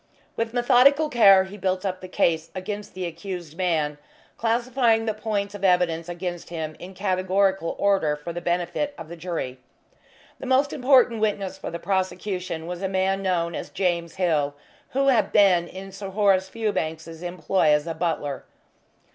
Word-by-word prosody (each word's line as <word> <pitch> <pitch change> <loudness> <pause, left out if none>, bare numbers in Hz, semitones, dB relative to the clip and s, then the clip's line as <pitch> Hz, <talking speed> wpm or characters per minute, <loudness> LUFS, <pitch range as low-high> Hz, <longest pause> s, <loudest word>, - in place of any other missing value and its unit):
With 230 0 -2
methodical 260 +5 +4
care 200 -6 +7
he 190 +2 -9
built 185 0 -1
up 185 -1 -3
the 185 - -7
case 165 -4 +1
against 205 +2 -6
the 185 -1 -3
accused 170 -1 -6
man, 160 -5 0 0.4
classifying 235 0 +1
the 220 - 0
points 205 -2 -2
of 205 -1 -9
evidence 175 -3 +2
against 175 0 -5
him 160 -2 -5
in 185 +2 -10
categorical 190 -1 +1
order 195 -7 +2
for 150 +3 -7
the 175 - -5
benefit 175 - -1
of 160 - -9
the 170 - -7
jury. 165 -7 -4 0.8
The - - -6
most 265 +2 +2
important 250 -4 +4
witness 205 -3 -1
for - - -5
the 170 - -5
prosecution 185 -2 -2
was 175 +1 -5
a 190 - -1
man 190 +1 0
known 175 -3 0
as - - -5
James 170 -3 -1
Hill, 155 -6 +1 0.3
who 275 +1 +2
had 220 -6 +3
been 185 -4 +4
in 195 +2 -9
Sir 195 0 -7
Horace 195 -1 +2
Fewbanks's 165 -7 -3
employ 175 0 0
as 150 0 +3
a 165 - -3
butler. 160 -4 -2
185 Hz, 165 wpm, -24 LUFS, 170-205 Hz, 0.8 s, care